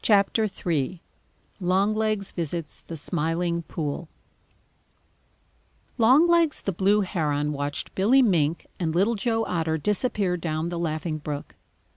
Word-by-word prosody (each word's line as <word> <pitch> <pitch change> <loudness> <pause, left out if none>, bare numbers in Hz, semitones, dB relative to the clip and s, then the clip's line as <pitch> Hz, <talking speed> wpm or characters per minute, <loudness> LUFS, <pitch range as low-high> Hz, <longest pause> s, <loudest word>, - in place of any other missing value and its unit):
] 215 -3 -2
III 165 0 0 0.6
LONGLEGS 200 +2 +1
VISITS 165 -2 -4
THE 165 - -5
SMILING 170 +2 -1
POOL 155 0 -4 1.9
Longlegs 315 +7 +4
the 195 - -1
Blue 200 +4 +2
Heron 150 -6 -1
watched 145 0 -4
Billy 245 +8 +4
Mink 170 -7 +1
and 165 -2 -1
Little 200 +6 +3
Joe 225 +1 0
Otter 160 -2 -1
disappear 205 - 0
down 160 -1 -2
the 175 -1 -4
Laughing 155 -1 -2
Brook. 145 -1 -6
175 Hz, 115 wpm, -25 LUFS, 160-210 Hz, 1.9 s, Longlegs